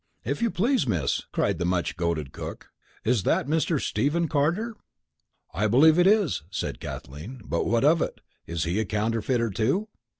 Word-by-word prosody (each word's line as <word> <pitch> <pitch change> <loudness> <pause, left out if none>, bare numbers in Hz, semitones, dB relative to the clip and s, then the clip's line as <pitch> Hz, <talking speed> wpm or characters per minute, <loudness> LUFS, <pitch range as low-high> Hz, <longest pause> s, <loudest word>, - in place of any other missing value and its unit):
"If - - -2
you 235 - +2
please, 225 - +1
Miss," 80 -10 0
cried - - 0
the - - 0
much 90 -1 0
goaded 85 -5 -2
cook, - - -7 0.3
"is 120 -2 +2
that - - +1
Mr. 160 +1 +1
Stephen 165 +6 0
Carter?" 170 +11 0 0.8
"I 105 +6 +1
believe 155 +9 +6
it 175 - +5
is," 205 - +3
said 95 - -4
Kathleen, 80 - -8
"but 85 - -1
what 115 +2 +2
of 160 +2 +5
it? - - -2 0.3
Is 85 -1 -2
he 85 +5 0
a 110 - 0
counterfeiter, 115 +3 0
too?" 135 - 0
120 Hz, 170 wpm, -26 LUFS, -, 0.8 s, believe